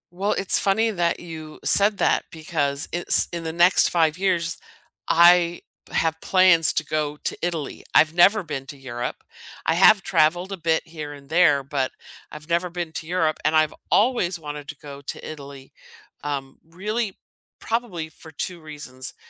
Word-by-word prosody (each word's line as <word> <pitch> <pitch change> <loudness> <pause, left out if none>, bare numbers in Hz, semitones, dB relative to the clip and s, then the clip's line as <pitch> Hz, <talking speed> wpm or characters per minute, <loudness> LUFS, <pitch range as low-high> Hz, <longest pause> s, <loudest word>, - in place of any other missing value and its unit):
Well, 200 +3 0
it's 195 - +2
funny 220 +3 +2
that 170 -3 0
you 160 -3 -9
said 205 +1 +4
that - - +2
because 150 -3 -2
it's 175 - +2
in 170 -1 -4
the 160 - -3
next 175 +2 +4
5 160 -2 +2
years, 180 -3 -1 0.5
I 175 0 +5 0.3
have 160 0 0
plans 185 -4 +4
to 155 - -1
go 150 -1 -2
to - - -2
Italy. 165 -5 -3
I've 155 +1 +5
never 195 +4 +5
been 135 -4 -6
to 145 - -9
Europe, 120 -2 -6 0.4
I 160 - +2
have 195 +3 +6
traveled 175 +5 +2
a 195 - -4
bit 160 -1 0
here 150 -3 -7
and 140 -1 -14
there, 160 -5 +4
but 135 -1 -2 0.4
I've 150 +1 -10
never 170 +1 0
been 175 -2 -5
to 160 - -6
Europe, 165 -3 0
and 155 +1 +2
I've 155 -1 +3 0.2
always 200 -6 +2
wanted 150 -1 -7
to 155 - -8
go 140 -2 -10
to - - -7
Italy, 140 -3 -10 0.5
um, 140 -2 -4
really 200 +5 -4 0.4
probably 205 -9 -3
for 160 0 -14
2 170 +3 -5
reasons. 145 -4 -8
165 Hz, 170 wpm, -23 LUFS, 150-180 Hz, 0.5 s, have